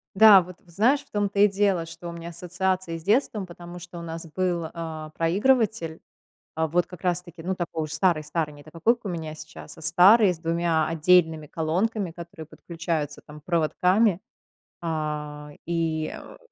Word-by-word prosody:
Да, 205 -1 +9
вот 180 0 -11
знаешь, 220 - +2
в - - -31
том-то 205 -1 -1
и 205 - +8
дело, 195 -4 +1
что 165 +1 -9
у - - -5
меня 170 0 -7
ассоциации 180 0 -2
с 165 - -12
детством, 210 - +1
потому 175 0 -10
что 175 0 -10
у - - -6
нас 165 0 -6
был, 175 -3 0
а, 160 -2 -6
проигрыватель, 190 0 +1 0.5
а 160 0 0
вот 175 +3 +1
как 180 -2 -12
раз 180 -1 +2
таки, 175 -2 -12
ну, 185 +3 -1
такой 170 -3 -3
уж 155 - -7
старый 165 -1 +2
старый, 150 0 -3
не 145 - -14
та 155 - -15
такой, 170 +9 +2
как 240 - -25
у - - -3
меня 160 -3 -5
сейчас, 155 0 -11
а 160 - -13
старый 190 +5 +6
с 170 - -9
2 165 -1 +1
отдельными 160 -1 +3
колонками, 180 +6 -1
которые 170 -2 -10
подключаются 160 -2 -4
там 150 0 -11
проводками, 180 +5 +2 0.6
а, 150 -2 -4
и, 160 -2 -1
э, - - -12
170 Hz, 180 wpm, -25 LUFS, 160-185 Hz, 0.6 s, Да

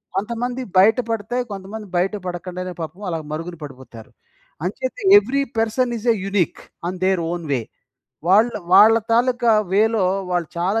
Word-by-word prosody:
కొంతమందివి 240 +4 -3
బయట 215 +5 +5
పడతాయి. 225 +3 -2
కొంతమంది 200 +2 -7
బయట 185 +3 +1
పడకుండానే 180 +1 -5
పాపం 165 +5 -7
అలా 165 - -2
మరుగున 165 +3 -5
పడిపోతారు. 130 -5 -11 0.5
అంచేత - - -3 0.2
every 280 -8 +1 0.2
person 235 +2 +1
is 225 - -7
a - - -3
unique 195 -3 0 0.3
an 185 0 -6
ధేర్ 190 -2 +2
own 175 -1 -4
way 130 -4 +1 0.7
వాళ్ళ, 215 +6 +5 0.2
వాళ్ళ 215 +3 +8 0.2
తాలూకా 240 0 +2 0.2
వేలో 220 -1 +3 0.3
వాళ్ళు 175 -3 -1
చాలా 195 +6 +1
200 Hz, 145 wpm, -21 LUFS, 180-230 Hz, 0.7 s, వాళ్ళ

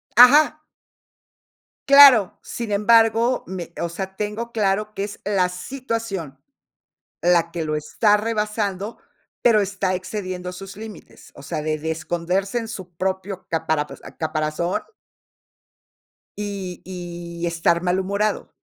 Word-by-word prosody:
Ajá. 295 +5 +7 1.2
Claro, 275 -8 +8
sin 235 -3 -5
embargo, 225 +3 +4
me, 175 -2 -7
o 170 - -1
sea, 190 +3 -6
tengo 215 +3 -4
claro 210 0 0
que 195 - -3
es 205 0 -6
la 190 -3 +2
situación, 200 - -5 0.8
la 170 -1 +3
que 170 -2 -3
lo 155 0 -1
está 205 +8 +2
rebasando, 210 -1 -2 0.4
pero, 230 -3 +5
está 195 -1 -1
excediendo 185 -1 -4
sus 195 +1 -9
límites, 220 -1 -11
o 140 - -12
sea, 150 - -3
de 155 0 -1
de 160 +1 -3
esconderse 175 +6 -1
en 225 -1 -6
su 185 -6 -8
propio 190 +1 -3
capara 160 -2 0 0.3
caparazón 155 +2 -1 1.5
y 200 -4 -5
y 175 -1 -6
estar 170 0 +1
malhumorado. 195 +3 0
190 Hz, 120 wpm, -22 LUFS, 170-215 Hz, 1.5 s, Claro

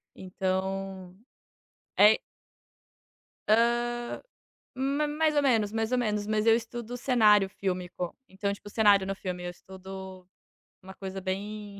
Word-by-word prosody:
Então, 190 0 -3 0.8
é 210 +1 +8
i - - -4 1.3
Hã. 230 +2 +6 1.1
Ma 275 +3 0
mais 305 +1 +1
ou 290 - +3
menos, 225 -6 +2
mais 225 +1 -1
ou 250 - +2
menos. 210 -4 0
Mas, 215 0 0
eu 225 0 +6
estudo 235 +1 -5
cenário 215 -6 +4
fílmico. 180 -2 -4
Então, 200 +1 -3
tipo, 205 +1 -11
cenário 205 -3 +4
no 195 - -2
filme, 180 -2 -5
eu 175 - -3
estudo 190 0 -10 0.6
uma 190 0 -10
coisa 190 0 -6
bem 200 +2 -5
205 Hz, 130 wpm, -28 LUFS, 190-225 Hz, 1.3 s, é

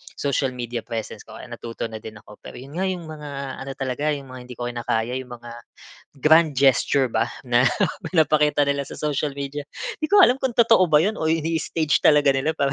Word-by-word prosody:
social 140 -2 -1
media 120 -1 -4
presence 115 -2 -6
ko. - - -14
Natuto 115 0 -6
na 110 - -7
din 110 0 -10
ako. 105 0 -15
Pero - - -10
yun 135 +4 -11
nga 185 - 0
'yung 180 -3 -4
mga, 145 -3 -7
ano 135 - -6
talaga 135 +3 -1
'yung 140 -2 -5
mga 130 0 -9
hindi 125 - -9
ko 120 - -3
kinakaya 120 0 -2
'yung 130 -1 -8
mga, 120 0 -9 0.7
grand 160 +2 +5
gesture 135 0 +3
ba, 115 +1 +1 0.2
na 120 0 +3 0.5
pinapakita 150 -3 +3
nila 140 0 0
sa - - -9
social 150 -1 -1
media. 140 +1 -4 0.4
'Di 310 - 0
ko 410 - +6
nga - - +8
alam 255 - -1
kung 265 -2 -1
totoo 225 -6 +5
ba 150 -1 +6
yun, 215 +2 -1
o 160 - 0
ini-stage 160 -1 0
talaga 150 -2 +5
nila 135 +4 0
para 140 -1 0
140 Hz, 210 wpm, -23 LUFS, 125-155 Hz, 0.7 s, nga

